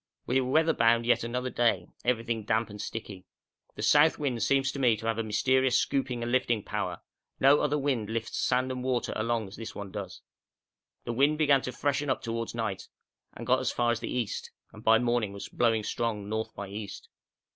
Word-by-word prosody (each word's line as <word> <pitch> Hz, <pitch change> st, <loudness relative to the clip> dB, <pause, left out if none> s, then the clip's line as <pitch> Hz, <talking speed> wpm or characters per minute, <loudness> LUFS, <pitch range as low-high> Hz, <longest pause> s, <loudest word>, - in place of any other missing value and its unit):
We 130 Hz, +2 st, +2 dB
were 125 Hz, -, -3 dB
weatherbound 120 Hz, -7 st, +3 dB
yet 120 Hz, -, +3 dB
another 125 Hz, +2 st, -3 dB
day, 120 Hz, -1 st, +2 dB, 0.2 s
everything 115 Hz, -2 st, 0 dB
damp 110 Hz, +1 st, 0 dB
and 105 Hz, 0 st, -7 dB
sticky. 100 Hz, -4 st, -7 dB, 0.5 s
The -, -, -5 dB
south 150 Hz, +2 st, +5 dB
wind 130 Hz, -6 st, -2 dB
seems 135 Hz, -1 st, +2 dB
to 140 Hz, -, -6 dB
me 120 Hz, -4 st, +3 dB
to 110 Hz, -, -8 dB
have 115 Hz, -1 st, 0 dB
a -, -, +1 dB
very 110 Hz, -, -6 dB
mysterious 130 Hz, +4 st, +3 dB
scooping 125 Hz, -3 st, -1 dB
and 120 Hz, -, -3 dB
lifting 120 Hz, -4 st, +1 dB
power; -, -, -3 dB, 0.4 s
no 140 Hz, +2 st, +6 dB
other 150 Hz, 0 st, +1 dB
wind 130 Hz, -7 st, -1 dB
lifts 115 Hz, 0 st, -3 dB
sand 130 Hz, +1 st, +1 dB
and 125 Hz, -1 st, -4 dB
water 125 Hz, -1 st, -1 dB
along 110 Hz, -1 st, -1 dB
as 95 Hz, -, -11 dB
this 115 Hz, -, -7 dB
one 100 Hz, -2 st, -7 dB
does. 95 Hz, -4 st, -7 dB, 0.8 s
The 120 Hz, -, -3 dB
wind 140 Hz, +5 st, +3 dB
began 145 Hz, -3 st, +4 dB
to 125 Hz, -, -4 dB
freshen 145 Hz, +2 st, -1 dB
up 130 Hz, -, 0 dB
towards 115 Hz, 0 st, -3 dB
night 110 Hz, -5 st, -3 dB, 0.5 s
and -, -, -8 dB
got -, -, +3 dB
as -, -, -1 dB
far 120 Hz, -1 st, +1 dB
as 120 Hz, -, -1 dB
the -, -, -5 dB
east, 120 Hz, -4 st, -3 dB, 0.2 s
and -, -, -12 dB
by 110 Hz, 0 st, +6 dB
morning 120 Hz, -3 st, 0 dB
was 100 Hz, -, -7 dB
blowing 115 Hz, -2 st, +1 dB
strong 105 Hz, -2 st, -2 dB
north 110 Hz, +1 st, -3 dB
by 100 Hz, -, -6 dB
east. 105 Hz, 0 st, -7 dB
120 Hz, 210 wpm, -29 LUFS, 110-130 Hz, 0.8 s, no